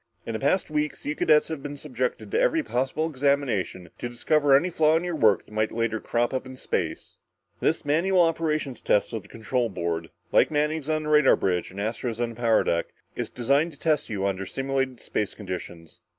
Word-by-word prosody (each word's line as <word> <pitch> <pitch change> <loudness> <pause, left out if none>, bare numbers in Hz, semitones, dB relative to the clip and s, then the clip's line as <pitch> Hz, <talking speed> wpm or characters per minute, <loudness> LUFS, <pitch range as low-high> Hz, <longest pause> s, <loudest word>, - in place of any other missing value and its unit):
In 115 - -4
the 110 - -2
past 155 +4 +1
weeks, 150 0 -2
you 150 - -1
cadets 150 0 +4
have 160 -3 -4
been 145 0 -6
subjected 130 -3 -3
to 445 - +2
every 415 -11 +2
possible 135 - -1
examination, 130 - 0
to 120 - -3
discover 140 +4 +3
any 170 +6 +3
flaw 155 -1 +4
in 165 - -2
your 175 -2 -2
work 110 -9 +3
that - - -20
might 110 0 0
later 115 -1 -1
crop 120 +3 0
up 130 - -1
in 130 - -9
space. - - -3 0.4
This 160 0 0
manual 175 +6 +3
operations 155 -5 -1
test 105 - +1
of 110 - -3
the 100 - -18
control 115 +1 -1
board, 85 -3 -3 0.2
like - - +5
Manning's 150 0 -1
on 155 0 0
the 150 - -4
radar 150 -2 +6
bridge 90 -2 -1
and 95 - -9
Astro's 115 +2 -3
on 120 -1 0
the 115 - -9
power 115 -1 +3
deck, 85 0 0 0.3
is - - -3
designed 140 +7 +1
to 140 - -18
test 155 -2 +1
you 100 -3 -2
under 95 -1 -1
simulated 135 -1 -2
space 105 - -3
conditions. 90 -4 -7
135 Hz, 210 wpm, -26 LUFS, 110-150 Hz, 0.4 s, radar